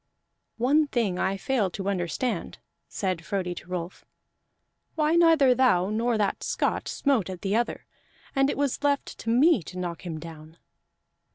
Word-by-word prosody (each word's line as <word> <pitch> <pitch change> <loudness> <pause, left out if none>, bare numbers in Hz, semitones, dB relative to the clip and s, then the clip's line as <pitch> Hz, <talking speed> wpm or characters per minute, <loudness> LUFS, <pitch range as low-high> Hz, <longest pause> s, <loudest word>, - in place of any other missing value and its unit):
"One 290 +6 +3
thing 220 -9 -1
I 195 +1 0
fail 220 -2 0
to 190 +2 -6
understand," 195 - -2 0.3
said 185 -4 -2
Frodi 180 0 -2
to 175 - -10
Rolf: 180 0 -5 0.9
"why 310 0 +2
neither 325 -6 +5
thou 210 -7 +3
nor 230 +1 +1
that 205 -2 0
Scot - - -1
smote 265 -10 0
at 185 -2 -7
the 200 +1 0
other, 235 +1 -1 0.5
and 270 0 +3
it - - -2
was 285 0 -1
left 285 -1 0
to 230 - -4
me 255 - +4
to 180 +2 -10
knock 175 -2 -4
him 165 -3 -5
down." 160 0 -11
210 Hz, 160 wpm, -26 LUFS, 180-270 Hz, 0.9 s, neither